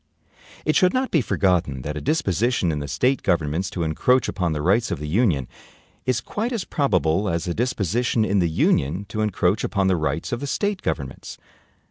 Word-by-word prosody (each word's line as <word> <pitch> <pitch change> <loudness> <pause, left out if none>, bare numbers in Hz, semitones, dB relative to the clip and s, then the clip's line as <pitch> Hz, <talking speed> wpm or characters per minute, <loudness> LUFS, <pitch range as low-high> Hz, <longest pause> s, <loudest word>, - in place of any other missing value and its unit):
It 155 - +2
should 185 +4 +4
not 260 0 0
be 160 - +3
forgotten 90 - 0
that 75 +2 -4
a 75 - -4
disposition 120 - +1
in 75 - -2
the 70 - -5
State 130 - +1
governments 85 0 0
to 90 -4 -3
encroach 120 +11 +2
upon 90 -4 -1
the 75 -1 -2
rights 105 +7 +2
of - - -2
the 75 +1 -6
Union 80 - +1 0.6
is 125 -2 +1
quite 225 - -3
as 225 -6 -2
probable 100 - +1
as 85 +1 -2
a 85 - -1
disposition 115 0 0
in 100 -1 +1
the 85 -2 +2
Union 80 +3 +1
to 110 - -3
encroach 100 -1 +1
upon 100 -2 0
the 95 - +3
rights 75 -1 -2
of 120 - -1
the 140 - -4
State 205 +5 -1
governments. 65 -1 -4
95 Hz, 195 wpm, -23 LUFS, 80-125 Hz, 0.6 s, should